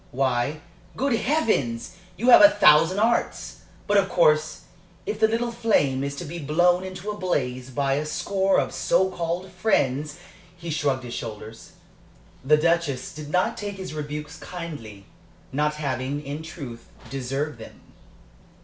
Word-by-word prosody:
Why, 130 +3 -1 0.4
good 270 +1 +1
Heavens! 220 - 0 0.2
you 240 +6 +3
have - - +10
a 300 - +10
thousand 155 - +5
arts! 230 +3 0 0.2
But, 205 - +2
of 195 -1 +3
course, 155 -3 +2 0.4
if 210 0 -3
the 220 - +5
little 235 +2 -1
flame 195 - +1
is 140 0 -3
to 155 - -6
be 170 +3 -6
blown 175 +5 +2
into 190 +2 -5
a 210 - -7
blaze 130 -9 -2
by 135 +1 0
a 145 +2 -1
score 195 +4 +1
of - - -2
so 190 0 +2
called 175 +2 -3
friends 150 - 0 0.2
" 175 +1 -25
He 170 -1 -6
shrugged 145 -4 0
his 120 -1 -7
shoulders. 110 0 -8 0.7
The 150 +3 +5
Duchess 160 -5 0
did 150 -1 -8
not 180 +4 +1
take 205 -1 -5
his 190 -4 -7
rebukes 150 +1 -6
kindly, 145 - -8 0.5
not 150 +2 0
having, 140 0 -3
in 145 +3 -5
truth, 135 -8 -9 0.2
deserved 135 +1 -3
them. 110 - -11
155 Hz, 155 wpm, -24 LUFS, 135-185 Hz, 0.7 s, have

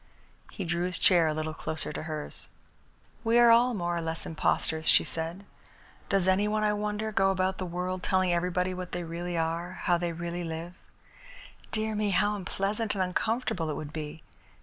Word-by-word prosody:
He 195 - -5
drew 175 +1 0
his 180 - -2
chair 175 -4 +5
a 155 - +1
little 155 0 -2
closer 160 0 -3
to - - -4
hers. 155 -2 -6 0.8
"We 230 +1 +3
are 240 -1 +8
all 240 +1 +5
more 175 -3 -1
or - - -1
less 165 0 -3
impostors," 160 0 0
she - - +6
said. 165 +4 -4 0.6
"Does 195 -3 +3
any 190 +2 +3
one, 215 0 0
I 210 0 +3
wonder, 210 +1 -2
go 195 -2 +3
about 190 0 0
the 185 - -2
world 180 +1 -3
telling 185 -1 +2
everybody 180 +1 0
what 180 -1 -6
they 175 0 -2
really 170 +1 -4
are, 165 +2 -1
how 175 -1 +3
they 175 -1 -1
really 175 +1 -4
live? 165 +1 -5 1.0
Dear 220 0 -1
me, 210 -1 0
how 205 +2 +3
unpleasant 205 +3 -2
and 190 - +1
uncomfortable 185 -2 -1
it 150 - -2
would 150 -1 -6
be! 155 0 -6
180 Hz, 190 wpm, -29 LUFS, 165-205 Hz, 1.0 s, are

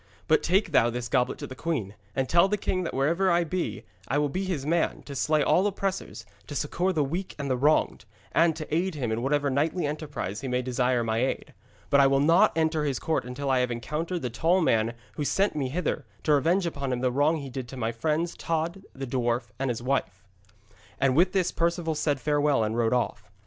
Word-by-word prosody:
'But 155 - +4
take 185 +1 +1
thou 120 -5 +4
this 120 0 -4
goblet 125 0 +1
to - - -6
the - - -8
queen, 130 - -3 0.2
and 135 -1 0
tell 170 +5 +5
the 210 +1 0
king 185 -1 -1
that - - -4
wherever 165 +8 +2
I 175 0 +3
be, 175 +2 -3 0.2
I 140 - 0
will 145 0 +1
be 190 +7 -2
his 165 -8 -2
man, 165 +2 0
to 145 - -8
slay 150 +2 +2
all 190 +7 +3
oppressors, 195 - -3 0.2
to 145 - -7
succour 175 +6 0
the 155 -5 +1
weak 175 +7 -4
and 140 -2 -3
the - - +2
wronged, 145 +5 +2 0.3
and 165 +3 +3
to 155 -1 -4
aid 180 +1 0
him 125 -6 -2
in 110 +1 -1
whatever 140 +2 +1
knightly 155 +5 0
enterprise 145 - -4
he 135 - -4
may 125 0 0
desire 125 -1 +1
my 110 0 0
aid. 130 +2 -2 0.4
But 140 - +6
I 140 - +7
will 135 0 +3
not 165 +9 +5
enter 160 -1 +1
his 140 -4 0
court 160 -4 -1
until 135 +2 -3
I 130 - +3
have 125 0 +1
encountered 150 +8 -3
the 125 - -2
tall 165 +10 +2
man 115 -10 +3
there 115 - -6 0.2
who 150 - -1
sent 195 +7 +1
me 135 -4 -1
hither, 165 +4 -2 0.2
to 150 - +3
revenge 170 +6 +2
upon 140 -5 -3
him 125 -1 -1
the 130 -1 +1
wrong 145 +5 +2
he 140 -3 -7
did 130 -1 -5
to 130 - -9
my 115 -2 -1
friends, 155 +8 -1
Tod 165 +3 -2
the 135 0 -4
dwarf 120 -2 -1
and 135 0 0
his 120 -1 -3
wife.' 125 -7 -1 0.8
And 135 -2 +2
with 175 +4 +4
this 185 -3 +1
Perceval 170 -1 0
said 150 -2 0
farewell 145 -2 +2
and 110 +1 -1
rode 115 -1 +1
off. 110 -4 -1
145 Hz, 230 wpm, -27 LUFS, 125-165 Hz, 0.8 s, I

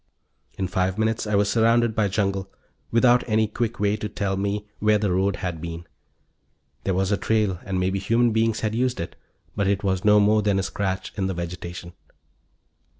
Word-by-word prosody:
In 95 - -1
five 95 0 -1
minutes 110 0 0
I 105 - 0
was 100 0 +3
surrounded 115 +2 +3
by 105 -1 +1
jungle, 95 -1 -1 0.4
without 120 +1 +4
any 110 0 +3
quick 115 +2 -3
way 105 0 +2
to 105 0 -4
tell 100 -1 -2
me 100 +2 -2
where 105 0 +3
the 105 -2 0
road 95 +2 +1
had 90 -4 -4
been. 85 0 -6 1.0
There 95 - +1
was 95 +1 0
a 100 - +2
trail, 105 -5 0
and 95 -3 -2
maybe 95 +1 0
human 115 +4 +2
beings 110 0 +1
had 110 -1 -1
used 125 +2 0
it, 85 - -5 0.4
but 100 -2 0
it 100 0 0
was 95 -2 0
no 105 0 +6
more 105 +1 +4
than 100 -1 +1
a 95 - 0
scratch 95 -1 -3
in 95 -2 0
the 95 - -3
vegetation. 85 0 -6
100 Hz, 195 wpm, -24 LUFS, 95-110 Hz, 1.0 s, no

